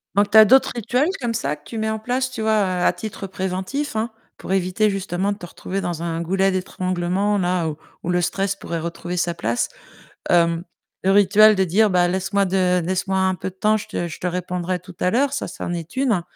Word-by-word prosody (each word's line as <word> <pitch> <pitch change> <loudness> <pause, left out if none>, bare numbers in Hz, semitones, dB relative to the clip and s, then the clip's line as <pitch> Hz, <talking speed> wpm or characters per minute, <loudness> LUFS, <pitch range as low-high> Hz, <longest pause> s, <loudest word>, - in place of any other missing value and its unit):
donc 205 0 +3
tu 220 - +6
as 220 - +11
d'autres 265 +4 +5
rituels 250 +6 +1
comme 235 -1 -1
ça 150 -7 -1
que 150 - -24
tu 230 - -8
mets 220 0 -1
en 220 - -1
place, 255 +3 -1
tu 240 -3 -6
vois? 220 -1 +2 0.2
À - - +5
titre 210 -2 -7
préventif, 190 +9 -3
hein, 220 +2 -1 0.3
pour - - -7
éviter 190 +3 +2
justement, 195 0 -1
de 200 - -4
te 175 - -8
retrouver 190 +2 -5
dans 170 -3 -3
un 165 0 -2
goulet 190 +3 +1
d'étranglement-là, 185 -1 0
où 150 - -6 0.3
où 180 - -3
le 180 0 +2
stress 195 +3 -1
pourrait 170 -3 -4
retrouver 170 +2 -5
sa 175 -1 0
place. 115 -6 -1 0.6
Hem, 170 -1 +3 0.4
le 190 - +3
rituel 210 +1 +6
de 190 - +3
dire, 205 +5 +3
bah: 180 -1 +3
«Laisse-moi 195 +2 0
de 180 -1 +2
laisse-moi 190 +1 -1
un 190 0 +2
peu 180 - -5
de 185 - -23
temps, 215 +3 +2
je 210 - -9
te 175 - -3
je - - -9
te 180 - -2
répondrai 180 0 -2
tout 180 0 -14
à 180 - +2
l'heure», 275 +4 +2
ça, 285 - -3
ça - - -7
en - - -3
est 170 +4 -6
1. 240 -9 +1
190 Hz, 225 wpm, -22 LUFS, 175-215 Hz, 0.6 s, as